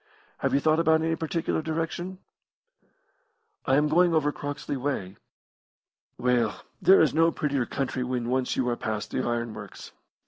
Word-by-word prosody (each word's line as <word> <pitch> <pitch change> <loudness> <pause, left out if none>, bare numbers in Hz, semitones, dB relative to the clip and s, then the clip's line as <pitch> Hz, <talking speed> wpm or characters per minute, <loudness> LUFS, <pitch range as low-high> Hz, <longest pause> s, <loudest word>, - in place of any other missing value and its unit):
Have - - +1
you - - +4
thought 155 +2 +2
of 165 - 0
any 160 +1 +3
particular 160 0 -2
direction?" 165 +3 -3 1.5
"I 135 - +4
am 150 +2 +3
going 170 +2 +4
over 150 -2 +2
Croxley 145 0 -5
way." 125 -8 -3 1.0
"Well, 120 -3 +1 0.2
there 190 - +7
is 160 - +3
no 165 +2 +4
prettier 140 -6 -1
country 130 -1 -2
when 125 -1 -2
once 130 +1 0
you 130 - 0
are 120 - 0
past 110 -2 -4
the - - -1
iron 120 -1 -2
works. 105 -2 -10
145 Hz, 160 wpm, -27 LUFS, 125-160 Hz, 1.5 s, there